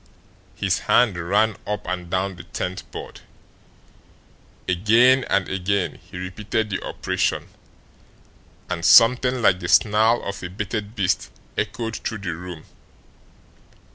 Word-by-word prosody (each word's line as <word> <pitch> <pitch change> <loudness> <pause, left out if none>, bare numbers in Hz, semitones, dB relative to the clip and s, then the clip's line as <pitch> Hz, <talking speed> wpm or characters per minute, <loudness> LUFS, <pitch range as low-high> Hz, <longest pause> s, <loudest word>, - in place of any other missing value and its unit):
His - - 0
hand 120 -6 +4
ran 100 +5 +1
up 105 0 -3
and 90 -1 -4
down 95 +1 -1
the - - -10
tenth 90 +1 -5
board. - - -9 1.5
Again 115 +8 +4
and 100 -2 +1
again 95 0 -1
he 95 - -9
repeated 105 +4 -3
the 95 - -3
operation, - - -2 1.2
and 85 - -4
something 125 +5 +5
like 90 -3 +4
the 90 - -5
snarl 110 +2 +4
of 100 0 -5
a 90 - -5
baited 105 +3 -4
beast 95 -5 0 0.3
echoed 115 +1 -3
through 110 - -4
the 95 -5 -4
room. 85 -1 -9
100 Hz, 125 wpm, -23 LUFS, 90-110 Hz, 1.5 s, something